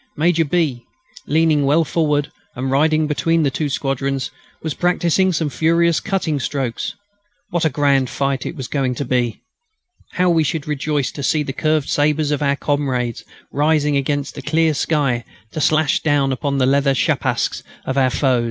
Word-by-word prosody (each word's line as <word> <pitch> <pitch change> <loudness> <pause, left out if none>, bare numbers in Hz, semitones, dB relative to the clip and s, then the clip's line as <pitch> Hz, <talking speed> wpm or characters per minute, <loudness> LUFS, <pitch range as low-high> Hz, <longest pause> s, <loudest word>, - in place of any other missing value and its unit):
Major 165 +1 +2
B., 145 -6 0 0.4
leaning 155 -1 +3
well 150 +4 +3
forward, 150 -2 0 0.2
and 130 +1 -3
riding 155 +3 +3
between 155 +3 +1
the 140 - +1
two 150 +2 -2
squadrons, 135 -1 -2 0.3
was 160 -2 -2
practising 180 +1 +2
some 155 -3 -1
furious 170 +2 +2
cutting 180 -7 -1
strokes. 130 -3 -3 0.6
What 175 -2 0
a - - +4
grand 140 -2 +2
fight 135 -2 -1
it - - -5
was 135 -5 -6
going 130 -3 -1
to 140 - -3
be! 120 -3 -1 0.7
How 180 0 +2
we 165 -2 +3
should 155 0 -2
rejoice 145 -3 -1
to 140 - -7
see 150 +2 +1
the 135 - -5
curved 155 -1 0
sabres 150 0 +1
of 145 - -1
our 140 -1 +2
comrades 135 -5 -1 0.3
rising 150 0 +2
against 140 0 -1
the 140 - -7
clear 155 +3 +2
sky 140 -5 0 0.3
to 155 - -4
slash 155 -1 +2
down 145 -3 +1
upon 140 +1 -1
the 130 - +3
leather 140 +1 +2
schapskas - - 0 0.2
of 130 - -2
our 130 -2 +3
foe! 130 0 +1
145 Hz, 170 wpm, -19 LUFS, 135-155 Hz, 0.7 s, a